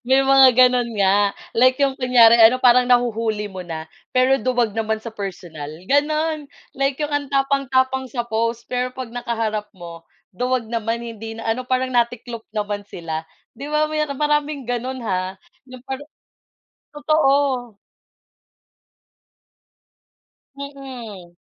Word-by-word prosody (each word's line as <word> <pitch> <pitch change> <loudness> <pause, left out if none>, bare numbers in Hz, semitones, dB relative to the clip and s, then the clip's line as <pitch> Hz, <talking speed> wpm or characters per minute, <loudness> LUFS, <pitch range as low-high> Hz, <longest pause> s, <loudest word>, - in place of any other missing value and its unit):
May 265 +1 +5
mga 270 -1 +7
ganon 250 -1 +4
nga 200 +1 +3 0.2
like 255 +2 +4
yung 275 -1 +2
kunyari 240 -2 +6
ano 225 +3 +7
parang 250 0 +5
nahuhuli 230 -3 +1
mo 190 -1 -7
na. 160 -2 -6 0.3
Pero 255 +1 +4
duwag 240 -2 0
naman 220 0 -1
sa 225 0 -8
personal 175 -7 -7 0.2
ganon 305 +1 +1 0.3
like 275 0 0
yung 295 -1 -2
ang 290 -1 -1
tapang-tapang 265 -1 +1
sa 240 -1 -3
post 230 +1 -1
pero 250 0 -1
'pag 255 -3 -7
nakaharap 225 -3 -3
mo. 170 -1 -10 0.3
Duwag 250 +2 -1
naman 230 0 -2
hindi 225 -1 -7
na 225 0 -3
ano, 250 +3 -2
parang 255 0 0
natiklop 235 -1 -1
naman 205 -1 -3
sila. 160 -4 -6 0.3
Di 275 +5 -8
ba 305 +1 0
may 305 0 0
naka 280 - -5
maraming 295 0 0
ganon 250 +1 -3
ha. 185 -2 -2 0.3
Yung 255 -1 -12
parang 270 +2 -6 0.9
totoo. 275 -6 +1 2.8
Mm. 245 -11 -9
245 Hz, 135 wpm, -21 LUFS, 220-270 Hz, 2.8 s, mga